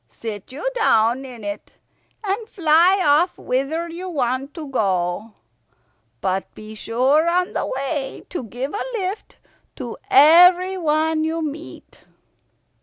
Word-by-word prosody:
Sit 205 Hz, -, -8 dB
you 295 Hz, -, -5 dB
down 250 Hz, -, +2 dB
in 245 Hz, -4 st, -10 dB
it, 205 Hz, 0 st, -6 dB, 0.5 s
and 420 Hz, +3 st, -3 dB
fly 350 Hz, +2 st, +3 dB
off 305 Hz, +5 st, +3 dB
whither 275 Hz, +7 st, -2 dB
you 350 Hz, +3 st, -7 dB
want 270 Hz, -2 st, -2 dB
to 315 Hz, -4 st, -7 dB
go. 195 Hz, -3 st, -1 dB, 0.9 s
But 190 Hz, 0 st, -2 dB
be 215 Hz, 0 st, -10 dB
sure 260 Hz, +9 st, +1 dB
on 360 Hz, +1 st, 0 dB
the -, -, -2 dB
way 275 Hz, +1 st, -4 dB
to 350 Hz, -, -4 dB
give 250 Hz, +6 st, -5 dB
a 415 Hz, -, -2 dB
lift 390 Hz, +1 st, -5 dB, 0.4 s
to -, -, -7 dB
everyone 335 Hz, -2 st, +5 dB
you 320 Hz, +1 st, -2 dB
meet." 310 Hz, +2 st, -8 dB
300 Hz, 125 wpm, -21 LUFS, 245-345 Hz, 0.9 s, everyone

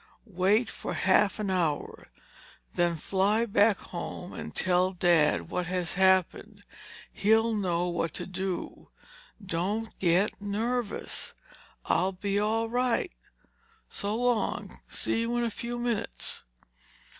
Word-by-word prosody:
"Wait 205 Hz, +3 st, +2 dB
for -, -, -5 dB
half 195 Hz, +1 st, +3 dB
an 210 Hz, -3 st, -2 dB
hour. 165 Hz, -6 st, -1 dB, 0.7 s
Then 175 Hz, -1 st, +2 dB
fly 200 Hz, +7 st, +1 dB
back 205 Hz, -1 st, +4 dB
home 175 Hz, +1 st, -7 dB
and -, -, -7 dB
tell 185 Hz, +1 st, +2 dB
Dad 170 Hz, -4 st, +3 dB
what 180 Hz, -1 st, -1 dB
has 180 Hz, -1 st, -2 dB
happened. 190 Hz, -1 st, +2 dB, 0.5 s
He'll 225 Hz, +2 st, +3 dB
know 180 Hz, -4 st, 0 dB
what 170 Hz, -2 st, -1 dB
to -, -, -4 dB
do. 185 Hz, -1 st, -5 dB, 0.6 s
Don't 200 Hz, +6 st, -2 dB
get 185 Hz, +4 st, +2 dB
nervous—I'll 210 Hz, -3 st, -3 dB
be 200 Hz, +2 st, -1 dB
all 220 Hz, +2 st, +1 dB
right. 250 Hz, +8 st, 0 dB, 0.8 s
So 205 Hz, +1 st, -3 dB
long. 245 Hz, -1 st, 0 dB
See -, -, -1 dB
you 230 Hz, +1 st, 0 dB
in 240 Hz, -, +1 dB
a 230 Hz, -, -1 dB
few 240 Hz, +3 st, -5 dB
minutes." 240 Hz, -3 st, -2 dB
200 Hz, 120 wpm, -28 LUFS, 180-225 Hz, 0.8 s, back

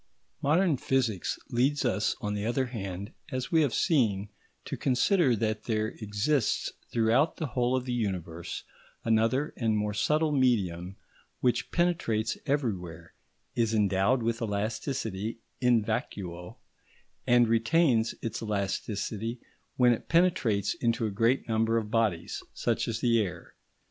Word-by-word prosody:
Modern 160 Hz, +1 st, +3 dB
physics 120 Hz, -8 st, 0 dB
leads 135 Hz, +4 st, +1 dB
us 110 Hz, -3 st, +1 dB
on 105 Hz, -4 st, -2 dB
the 105 Hz, 0 st, -2 dB
other 120 Hz, +4 st, 0 dB
hand, 100 Hz, -3 st, -6 dB, 0.2 s
as 130 Hz, -1 st, -3 dB
we 165 Hz, -2 st, +5 dB
have 145 Hz, -5 st, +2 dB
seen, 105 Hz, -, +2 dB, 0.4 s
to -, -, -4 dB
consider 135 Hz, -, +3 dB
that 110 Hz, 0 st, -2 dB
there 110 Hz, -2 st, 0 dB
exists 110 Hz, +4 st, 0 dB, 0.2 s
throughout 120 Hz, +7 st, +2 dB
the 160 Hz, -, -2 dB
whole 125 Hz, 0 st, +2 dB
of 130 Hz, -1 st, -1 dB
the 125 Hz, -, -2 dB
universe 90 Hz, -7 st, -3 dB, 0.4 s
another 115 Hz, +6 st, +2 dB
and 110 Hz, -3 st, +1 dB
more 105 Hz, 0 st, -1 dB
subtle 150 Hz, +9 st, +1 dB
medium 95 Hz, -, +1 dB, 0.4 s
which 125 Hz, -, +1 dB
penetrates 120 Hz, -11 st, +1 dB
everywhere, 90 Hz, -, -2 dB, 0.4 s
is 115 Hz, -1 st, +1 dB
endowed 105 Hz, +4 st, +2 dB
with 115 Hz, +1 st, -1 dB
elasticity 110 Hz, 0 st, -2 dB, 0.2 s
in 125 Hz, -3 st, +3 dB
vacuo, 90 Hz, -4 st, -4 dB, 0.7 s
and 120 Hz, -1 st, +5 dB
retains 115 Hz, +1 st, +2 dB
its 115 Hz, -1 st, -3 dB
elasticity 105 Hz, +2 st, -2 dB, 0.4 s
when 125 Hz, -1 st, +5 dB
it 115 Hz, -, -6 dB
penetrates 165 Hz, -, +2 dB
into 115 Hz, -1 st, 0 dB
a 105 Hz, -, -1 dB
great 115 Hz, +6 st, +1 dB
number 115 Hz, 0 st, +2 dB
of 110 Hz, -2 st, -3 dB
bodies, 105 Hz, -7 st, 0 dB
such -, -, 0 dB
as 115 Hz, -1 st, -2 dB
the 115 Hz, -2 st, +3 dB
air. 95 Hz, -5 st, -5 dB
115 Hz, 135 wpm, -29 LUFS, 105-130 Hz, 0.7 s, we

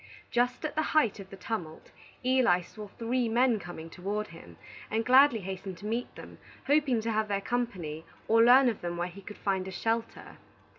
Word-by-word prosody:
Just 245 Hz, +5 st, 0 dB
at 300 Hz, -, -3 dB
the 310 Hz, -, +1 dB, 0.2 s
height 230 Hz, -9 st, +3 dB
of 190 Hz, -1 st, -10 dB
the 195 Hz, -, -10 dB
tumult, 175 Hz, -10 st, -6 dB, 0.3 s
Eli 250 Hz, -9 st, +4 dB
saw 210 Hz, +4 st, -10 dB
three 235 Hz, +3 st, -1 dB
men 235 Hz, -1 st, +3 dB
coming 170 Hz, -3 st, -8 dB
toward 200 Hz, +5 st, -4 dB
him, 85 Hz, -, -13 dB, 0.3 s
and 225 Hz, +1 st, -1 dB
gladly 255 Hz, -3 st, +6 dB
hastened 190 Hz, 0 st, -6 dB
to 200 Hz, -, -11 dB
meet 230 Hz, +3 st, -3 dB
them, -, -, -12 dB, 0.3 s
hoping 280 Hz, -5 st, +2 dB
to 225 Hz, +1 st, -2 dB
have 215 Hz, 0 st, 0 dB
their 200 Hz, -1 st, 0 dB
company 195 Hz, -9 st, -3 dB, 0.2 s
or 225 Hz, +1 st, +5 dB
learn 255 Hz, +3 st, +7 dB
of 230 Hz, -4 st, -1 dB
them 175 Hz, 0 st, -4 dB
where 175 Hz, +1 st, -1 dB
he 185 Hz, +3 st, -11 dB
could 210 Hz, +2 st, -10 dB
find 190 Hz, -2 st, -1 dB
a -, -, -5 dB
shelter. 225 Hz, +4 st, -3 dB
215 Hz, 195 wpm, -29 LUFS, 185-245 Hz, 0.3 s, learn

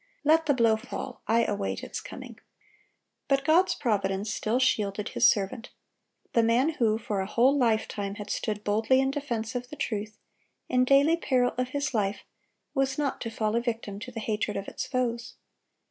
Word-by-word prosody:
Let 315 Hz, +1 st, +4 dB
the 285 Hz, -, +3 dB
blow 230 Hz, -3 st, +4 dB
fall, 220 Hz, -, -7 dB
I 230 Hz, +1 st, +3 dB
await 200 Hz, -1 st, -2 dB
its -, -, -5 dB
coming."(122) -, -, -10 dB, 0.9 s
But 275 Hz, 0 st, +1 dB
God's 345 Hz, +5 st, +4 dB
providence 200 Hz, -4 st, -1 dB
still 220 Hz, +3 st, 0 dB
shielded 210 Hz, -5 st, +1 dB
His -, -, +5 dB
servant. 220 Hz, +4 st, -1 dB, 0.6 s
The 230 Hz, -, +5 dB
man 235 Hz, +6 st, +3 dB
who 230 Hz, -8 st, +1 dB
for 210 Hz, -3 st, -2 dB
a 190 Hz, -, -3 dB
whole 250 Hz, +6 st, +3 dB
lifetime 220 Hz, -5 st, 0 dB
had 205 Hz, 0 st, -6 dB
stood 210 Hz, -1 st, -2 dB
boldly 220 Hz, +5 st, +2 dB
in 265 Hz, 0 st, +2 dB
defense 240 Hz, -6 st, -3 dB
of 245 Hz, 0 st, -4 dB
the 300 Hz, -, -8 dB
truth, 215 Hz, -5 st, -4 dB, 0.5 s
in 250 Hz, 0 st, +3 dB
daily 280 Hz, +5 st, +5 dB
peril 255 Hz, -6 st, +1 dB
of 255 Hz, 0 st, -1 dB
his 280 Hz, 0 st, -2 dB
life, 205 Hz, -2 st, -1 dB, 0.5 s
was 270 Hz, 0 st, 0 dB
not 290 Hz, -2 st, -1 dB
to 230 Hz, -, -3 dB
fall 220 Hz, -1 st, -1 dB
a 235 Hz, -, +2 dB
victim 225 Hz, -4 st, -4 dB
to 250 Hz, +4 st, -8 dB
the 230 Hz, -, -6 dB
hatred 210 Hz, -1 st, -2 dB
of 195 Hz, -, -5 dB
its -, -, -5 dB
foes. 240 Hz, -3 st, -2 dB
230 Hz, 180 wpm, -27 LUFS, 210-265 Hz, 0.9 s, His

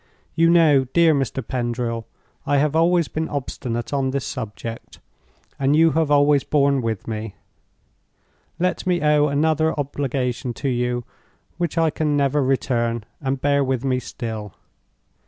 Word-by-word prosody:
You 165 Hz, +1 st, +3 dB
know, 155 Hz, -6 st, +5 dB
dear 170 Hz, -2 st, +5 dB
Mr. 135 Hz, -3 st, -2 dB
Pendril, 120 Hz, -2 st, -3 dB, 0.4 s
I 145 Hz, -, +1 dB
have 150 Hz, +2 st, +1 dB
always 170 Hz, 0 st, +3 dB
been 160 Hz, +1 st, -3 dB
obstinate 125 Hz, -3 st, -4 dB
on 135 Hz, -2 st, +1 dB
this 135 Hz, 0 st, -2 dB
subject, 115 Hz, -1 st, -7 dB, 0.6 s
and 140 Hz, +2 st, +2 dB
you 165 Hz, +1 st, +5 dB
have 160 Hz, -1 st, +1 dB
always 145 Hz, -1 st, +4 dB
borne 140 Hz, -2 st, +2 dB
with 115 Hz, -3 st, -3 dB
me. 110 Hz, -2 st, -5 dB, 1.2 s
Let 180 Hz, +1 st, -1 dB
me 180 Hz, -1 st, +2 dB
owe 150 Hz, 0 st, +4 dB
another 155 Hz, +2 st, +1 dB
obligation 130 Hz, -3 st, -2 dB
to 140 Hz, -, -2 dB
you 125 Hz, -1 st, -1 dB, 0.6 s
which 170 Hz, -2 st, -2 dB
I 165 Hz, -1 st, +3 dB
can 150 Hz, -2 st, 0 dB
never 140 Hz, 0 st, +2 dB
return, 120 Hz, -3 st, 0 dB, 0.2 s
and 135 Hz, -1 st, -1 dB
bear 140 Hz, +1 st, +2 dB
with 130 Hz, -1 st, -1 dB
me 130 Hz, -1 st, +1 dB
still! 110 Hz, -6 st, -6 dB
140 Hz, 145 wpm, -22 LUFS, 125-150 Hz, 1.2 s, know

